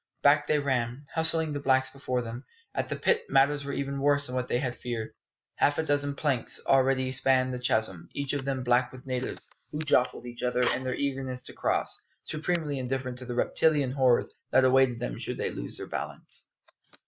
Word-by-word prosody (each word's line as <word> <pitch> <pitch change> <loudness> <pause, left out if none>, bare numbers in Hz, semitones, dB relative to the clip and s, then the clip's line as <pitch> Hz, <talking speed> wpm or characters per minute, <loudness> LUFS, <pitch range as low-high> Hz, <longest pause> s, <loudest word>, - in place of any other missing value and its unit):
Back 145 +1 +5
they 150 - +3
ran, 130 -1 -1
hustling 160 -1 +3
the 145 - -2
blacks 130 -1 +2
before 130 -2 -2
them. 120 +3 -7 0.3
At - - -2
the - - -1
pit 470 -1 +2
matters 145 +1 +3
were 140 - -4
even 140 0 -3
worse 145 0 +3
than 125 -1 -2
they - - +1
had 125 -1 -2
feared. 115 -3 -5 0.4
Half 145 - +3
a 160 - +1
dozen 145 -2 0
planks 140 -5 0
already 130 -1 +3
spanned 130 0 +2
the 125 - -4
chasm, 110 -7 +1
each 140 -1 -2
of 145 -2 -2
them 135 -1 -2
black 125 0 +2
with 130 -1 -12
natives, 130 -1 -4 0.2
who 150 - -4
jostled 140 -5 +1
each 120 0 -8
other 125 0 +1
in 130 - -3
their 130 - -1
eagerness 130 -2 -1
to - - -8
cross, - - +1 0.2
supremely 155 -3 -2
indifferent 130 -1 -3
to 125 - -8
the 120 -1 -5
reptilian 145 +1 +2
horrors 130 -3 +2 0.2
that 130 0 +4
awaited 130 -2 +4
them - - -4
should - - -4
they - - -1
lose - - -6
their - - -6
balance. - - -5
130 Hz, 195 wpm, -28 LUFS, 125-145 Hz, 0.4 s, Back